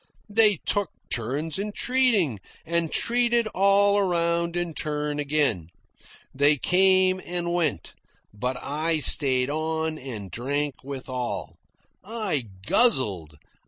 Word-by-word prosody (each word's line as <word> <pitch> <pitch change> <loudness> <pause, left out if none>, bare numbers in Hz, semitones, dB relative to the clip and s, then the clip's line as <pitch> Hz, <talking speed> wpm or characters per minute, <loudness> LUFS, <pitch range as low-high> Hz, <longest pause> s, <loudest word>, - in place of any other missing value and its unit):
They 210 -1 +5
took 205 -1 -1 0.2
turns 140 - -2
in 210 +1 -4
treating, 225 - +1 0.3
and 165 -1 -1
treated 235 -1 +2
all 200 +1 +3
around 170 -2 0
in 175 -2 -2
turn 150 -1 -3
again. 140 - 0 0.7
They 145 +2 +4
came 185 +3 +3
and 175 -1 -3
went, 155 - -2 0.4
but 125 +5 -3
I 155 +4 -1
stayed 135 -2 +4
on 160 0 -3
and 110 -8 -8
drank 140 - -3
with 135 -1 -8
all. 125 -2 -5 0.4
I 200 - -3 0.2
guzzled. 105 - +2
160 Hz, 115 wpm, -24 LUFS, 135-190 Hz, 0.7 s, They